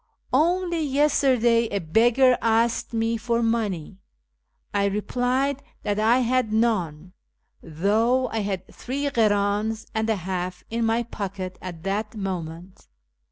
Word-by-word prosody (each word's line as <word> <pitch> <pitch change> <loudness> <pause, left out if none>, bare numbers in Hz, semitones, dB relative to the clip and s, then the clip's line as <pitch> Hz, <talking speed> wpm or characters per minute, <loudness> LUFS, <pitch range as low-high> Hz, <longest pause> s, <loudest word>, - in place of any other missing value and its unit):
Only 345 +4 +2
yesterday 265 -5 +3
a 200 - -2
beggar 235 +9 +4
asked 230 +1 +1
me 225 0 0
for 235 +1 0
money. 205 -6 -1 0.7
I 200 -1 +2
replied 250 +7 0 0.2
that 205 0 -1
I 230 +4 +4
had 250 -2 +1
none, 185 -7 0 0.5
though 220 +10 +1
I 225 - -2
had 195 -3 -3
three 270 +3 -4
kriins 215 -3 +1
and 220 0 -1
a 220 - +3
half 180 -1 -4
in 230 0 0
my 230 +1 +1
pocket 195 -5 -6
at 175 -3 -8
that 210 +3 -2
moment. 180 - -6
220 Hz, 125 wpm, -24 LUFS, 195-240 Hz, 0.7 s, beggar